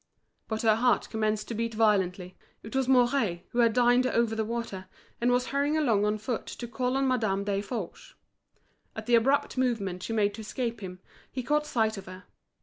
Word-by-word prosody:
But 220 0 -3
her 220 -1 +4
heart 245 +1 +2
commenced 215 -1 -1
to - - -3
beat 230 0 -2
violently. 190 -4 +1 0.3
It 220 - -8
was 265 -1 +1
Mouret, 245 -8 +2
who 240 - -3
had 230 -1 +5
dined 245 +1 +4
over 235 -2 +1
the 220 0 -1
water, 220 -4 -5 0.3
and 240 - +3
was 245 0 +1
hurrying 285 +2 +1
along 225 -9 +2
on 210 +1 +1
foot 220 +2 -4
to 240 - -6
call 250 +2 -1
on 270 0 +1
Madame 220 -6 +1
Desforges. 200 -1 -4 0.8
At - - -6
the 240 - 0
abrupt 255 +3 +3
movement 200 -8 -1
she 225 - -4
made 205 -2 +2
to 220 - -8
escape 235 +2 -3
him, 185 -1 -8 0.3
he 255 - -4
caught 300 +3 +1
sight 220 -5 0
of 195 - -9
her. 185 +1 -10
225 Hz, 195 wpm, -28 LUFS, 205-250 Hz, 0.8 s, had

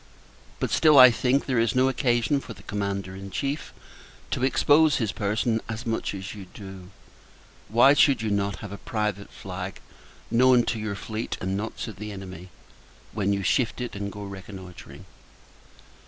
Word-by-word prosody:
But - - -2
still, 155 -2 +5
I 130 -1 +10
think, 125 +4 +1
there 125 -3 +1
is 115 +1 +1
no 130 +1 +4
occasion 130 +1 +1
for 120 - -9
the - - -15
Commander 100 -2 -3
in 95 0 -8
Chief 140 +8 -3 0.6
to - - -1
expose 145 +3 +4
his 110 -4 0
person 110 +2 0
as 115 +2 -5
much 115 -3 -2
as 95 0 -6
you 100 -3 -10
do. 95 -3 -10 0.8
Why 120 +6 +6
should 140 -5 +4
you 110 - -1
not 100 -1 -1
have 100 - -8
a 100 - -7
private 105 -2 -3
flag, 90 0 -7 0.5
known 125 0 +5
to 115 - -2
your 105 -2 -3
fleet 110 +2 -4
and 95 +1 -2
not 110 +3 -4
to 110 - -7
the 105 +1 -7
enemy, 95 -2 -9 0.6
when 100 -2 0
you 100 -1 -1
shift 120 +5 +1
it 125 -3 -5
and 100 0 -4
go 105 0 -8
reconnoitring? 95 -2 -10
105 Hz, 170 wpm, -26 LUFS, 100-125 Hz, 0.8 s, I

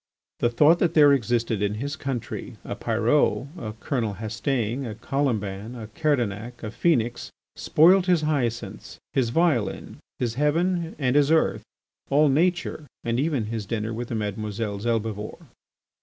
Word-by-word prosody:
The 120 - +2
thought 150 +8 +5
that 175 - +1
there 145 -2 +7
existed 115 -4 0
in 105 0 0
his 140 +6 -3
country 135 -6 -5
a - - -5
Pyrot, 120 +4 +1
a 110 -11 -6
Colonel 115 -8 -2
Hastaing, 120 +3 -2
a 110 -4 -5
Colomban, 110 -4 -2
a 110 -3 -8
Kerdanic, 120 -4 -1
a 105 - -4
Phœnix, 120 -6 0 0.3
spoilt 180 +4 +4
his 175 -3 +3
hyacinths, 120 -9 -2 0.2
his 130 -4 +1
violin, 145 -5 0 0.2
his 120 -2 -1
heaven, 165 +5 0
and 135 -2 0
his 145 -1 +4
earth, 160 0 +2 0.5
all 145 +2 +4
nature, 160 0 0 0.2
and 120 +1 0
even 145 -4 0
his 110 -2 -4
dinner 110 0 -2
with 120 +2 -4
the 115 - -4
Mesdemoiselles 105 0 -3
Helbivore! 110 -2 -2
120 Hz, 145 wpm, -25 LUFS, 110-150 Hz, 0.5 s, there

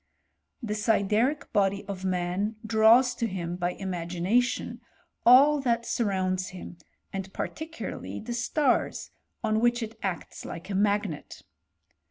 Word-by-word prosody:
The 210 -2 -2
sideric 220 +6 +1
body 200 0 +1
of 195 -2 -6
man 185 +3 -1
draws 225 +3 +5
to 235 -1 -2
him, 175 -4 -4
by 180 0 -1
imagination, 185 +6 -1 0.5
all 280 +4 +7
that 235 -3 0
surrounds 185 -5 0
him, 180 -1 -9 0.3
and 195 0 -5
particularly 320 +1 -5
the 240 +2 -5
stars, 250 +3 0 0.3
on 215 0 +2
which 240 +1 +2
it 225 0 -8
acts 185 -4 -4
like 170 +4 -7
a - - -2
mag 205 +1 +2
net. 155 -5 -9
210 Hz, 130 wpm, -27 LUFS, 185-235 Hz, 0.5 s, all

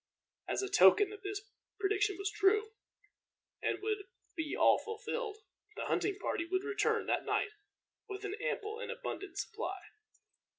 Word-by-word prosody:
As - - 0
a - - 0
token 380 - +7
that 415 -2 -9
this 400 0 -3 0.4
prediction 405 -1 +2
was 395 0 -1
true, 420 +1 +3 0.9
and - - -1
would 425 -2 -1 0.3
be 315 -3 -2
all - - +6
fulfilled, 445 0 -4 0.4
the - - -3
hunting 395 -1 +1
party 335 - -1
would 375 +3 -1
return 420 -1 +1
that - - +1
night 410 - +1 0.6
with 390 +1 -5
an 400 - -2
ample 440 -3 -2
and 485 -1 -5
abundant 475 -5 -5
supply. 420 -3 -3
410 Hz, 145 wpm, -34 LUFS, 390-430 Hz, 0.9 s, token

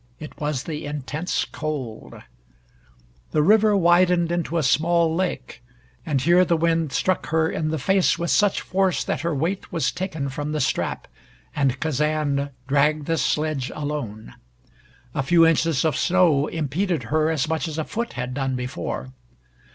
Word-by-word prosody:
It 155 - -10
was 150 -3 -1
the 150 -2 -5
intense 150 +4 -2
cold. 140 -8 -6 1.1
The 150 - +2
river 210 +3 +5
widened 175 -1 +3
into 170 -1 -1
a 160 - +1
small 165 +5 +2
lake, 165 -9 -3 0.5
and 145 -4 +1
here 175 +6 +4
the 170 -2 +1
wind 165 -2 +1
struck 185 +4 0
her 160 +1 +2
in 155 - -2
the 160 - -1
face 190 +7 +2
with 170 0 -2
such 205 -1 +3
force 190 -1 0
that - - -2
her 170 -2 -1
weight 170 +8 -2
was 145 -5 0
taken 165 -7 -4
from 145 +3 -4
the 155 - -1
strap, - - -1 0.5
and 135 -2 +1
Kazan 150 -2 0 0.2
dragged 145 +2 +2
the 165 0 0
sledge 150 -4 -1
alone. 130 - -5 0.8
A 150 - 0
few 165 +5 +5
inches 165 -2 +2
of 155 - +1
snow 170 -6 +3
impeded 160 0 -2
her 155 0 +3
as 160 -1 0
much 160 +1 -1
as 155 -1 -5
a 160 - 0
foot 235 +1 -4
had 125 0 -4
done 135 -1 -1
before. 125 +1 -5
155 Hz, 160 wpm, -23 LUFS, 140-170 Hz, 1.1 s, river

